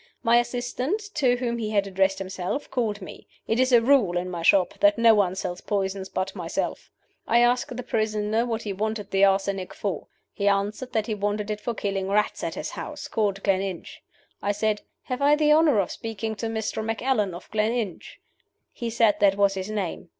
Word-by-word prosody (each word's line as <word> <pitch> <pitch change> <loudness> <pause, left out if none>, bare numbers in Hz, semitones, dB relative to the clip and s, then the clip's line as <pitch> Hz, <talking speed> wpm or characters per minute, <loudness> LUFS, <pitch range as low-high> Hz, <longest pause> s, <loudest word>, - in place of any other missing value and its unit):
My 235 -1 +5
assistant, 245 - -1
to 255 -4 +3
whom 235 -1 -2
he 215 -2 -2
had 205 -2 +1
addressed 195 0 +1
himself, 190 +7 -4
called 215 -5 -1
me. - - -11 0.2
It 225 - +1
is 260 0 +3
a 235 -2 +6
rule 235 -9 +4
in 180 +1 -3
my 170 -2 -4
shop 180 +1 +4
that 305 0 +5
no 230 -1 +6
one 195 -4 +2
sells 175 -1 -4
poisons 195 -1 -2
but 185 0 -3
myself. - - -3 0.4
I 235 - +3
asked 245 0 +1
the 250 - -4
prisoner 215 0 0
what 230 -2 -3
he 205 - -3
wanted 210 0 -3
the 195 0 +3
arsenic 195 -1 0
for. 195 -7 -3 0.3
He 200 - -1
answered 205 +5 0
that 220 -2 +1
he 220 - -2
wanted 205 +1 -2
it 210 0 -4
for 235 +1 -3
killing 195 -2 -2
rats 210 +1 +1
at - - -3
his - - -4
house, - - -6
called 200 -3 -1
Gleninch. 195 -2 -2 0.4
I 205 - 0
said, 210 0 0 0.2
'Have 255 0 -4
I 290 +1 +5
the 300 0 +3
honor 305 -5 +5
of 185 - 0
speaking 225 -1 -4
to 230 - -3
Mr. 220 -1 -3
Macallan, 220 -4 0
of 175 - -11
Gleninch?' 215 -2 -2 0.5
He 235 - -4
said 225 -2 +3
that 200 -1 +4
was 200 -1 +3
his 190 +1 -4
name. 195 -5 -4
210 Hz, 200 wpm, -25 LUFS, 195-235 Hz, 0.5 s, a